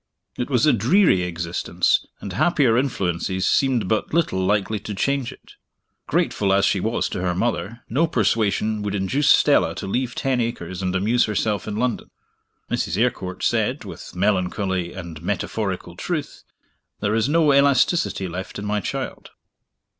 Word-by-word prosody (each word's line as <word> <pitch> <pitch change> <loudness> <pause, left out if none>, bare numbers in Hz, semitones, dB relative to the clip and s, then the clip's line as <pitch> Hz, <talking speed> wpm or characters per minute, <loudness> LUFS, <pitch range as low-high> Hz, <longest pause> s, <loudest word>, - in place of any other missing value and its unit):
It 125 - -3
was 130 +1 +3
a 150 - +5
dreary 125 - +4
existence, 85 -1 0
and 100 - -6
happier 135 - +3
influences 95 -7 -1
seemed 130 -7 +2
but 110 - -1
little 95 - +1
likely 105 +2 +1
to 105 +1 -6
change 140 +3 0
it. - - -16 0.5
Grateful 100 -2 +1
as 100 0 +3
she 95 - +2
was 110 +5 0
to - - -4
her 90 -1 0
mother, 115 +1 -2
no 150 +9 +1
persuasion 110 - +1
would 105 -1 -2
induce 115 +9 +1
Stella - - +4
to - - -5
leave 125 +5 -2
Ten 130 -2 0
Acres 95 -6 -4
and 90 0 -1
amuse 110 +6 +2
herself 105 -2 -1
in 105 - -3
London. 120 +1 -2 0.6
Mrs. 85 - -1
Eyrecourt 95 -6 -1
said, - - 0
with - - -10
melancholy 95 -2 0
and 85 -4 -8
metaphorical 95 -1 -3
truth, 155 - -4 0.5
"There 105 0 0
is 115 +4 +1
no 155 -2 +4
elasticity 140 - +3
left 90 +3 -6
in 100 - -5
my 105 0 0
child." - - -5
105 Hz, 155 wpm, -22 LUFS, 95-125 Hz, 0.6 s, a